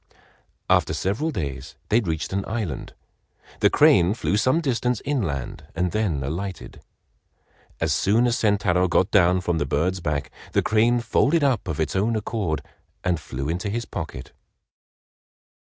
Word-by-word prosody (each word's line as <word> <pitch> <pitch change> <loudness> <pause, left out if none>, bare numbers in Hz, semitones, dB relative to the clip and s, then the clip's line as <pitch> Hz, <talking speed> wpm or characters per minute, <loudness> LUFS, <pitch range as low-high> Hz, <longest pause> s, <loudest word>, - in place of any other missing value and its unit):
After - - +2
several 110 +12 -1
days 70 - -5
they 110 - +4
reached 80 -5 -3
an 100 0 0
island. 105 - -4 0.6
The - - +5
crane 90 +4 +5
flew 105 - -1
some 130 +9 +3
distance 125 -6 0
inland 75 - -3
and 90 +1 0
then 95 -11 0
alighted. 90 +7 -5 1.0
As 80 -2 +1
soon 105 +9 +3
as 120 -1 +2
Sentaro 95 -4 +2
got 95 +3 +2
down 90 -1 +4
from 85 -2 -1
the 75 - -1
bird's 85 +7 0
back, 75 -3 -2 0.2
the - - +2
crane 115 +2 +3
folded 145 +7 +2
up 130 -7 +1
of 80 -3 -3
its 80 +2 -1
own 110 +4 +1
accord 100 -9 -2 0.4
and 90 -3 +1
flew 70 -2 -5
into 90 +6 -2
his 115 +3 -2
pocket. 65 - -7
95 Hz, 150 wpm, -24 LUFS, 80-110 Hz, 1.0 s, The